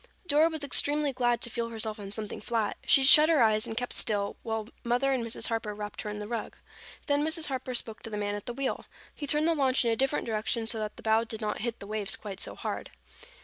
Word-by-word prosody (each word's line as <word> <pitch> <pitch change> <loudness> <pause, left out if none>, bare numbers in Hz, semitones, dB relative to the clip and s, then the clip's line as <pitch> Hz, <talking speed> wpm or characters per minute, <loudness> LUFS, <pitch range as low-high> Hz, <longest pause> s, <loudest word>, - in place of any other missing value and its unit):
Dora 315 0 +4
was 315 -3 -2
extremely 290 +1 +3
glad 240 -2 +1
to 240 - +1
feel 235 0 -2
herself 220 -1 -3
on 200 -1 -7
something 210 0 -5
flat. 225 -2 -1
She 270 - +6
shut 300 +3 +8
her 310 -7 +5
eyes 215 +1 +2
and 225 -1 -5
kept 245 0 -1
still 205 -2 0
while 220 -1 -3 0.2
Mother 245 +3 +1
and 255 -3 0
Mrs. 230 0 -2
Harper 225 -2 -2
wrapped 210 0 -5
her 210 - -5
in 210 - -5
the 210 0 -5
rug. 230 -1 -4 0.5
Then 290 0 +2
Mrs. 320 0 -1
Harper 255 -1 -3
spoke 225 -2 -1
to - - -6
the 210 - -4
man 205 0 -1
at 205 -1 -6
the 240 - -2
wheel. 275 0 -3 0.3
He 290 - -6
turned 300 +3 +2
the 335 - +4
launch 265 -4 +2
in 230 - +3
a - - +2
different 270 +4 0
direction 225 +1 -1
so 225 0 +1
that 215 -1 -4
the - - -11
bow 220 +1 +3
did 220 -1 -5
not 215 -2 -3
hit 235 0 -2
the - - -8
waves 210 0 -1
quite 200 -2 -7
so - - -2
hard. - - -4
230 Hz, 255 wpm, -29 LUFS, 215-270 Hz, 0.5 s, shut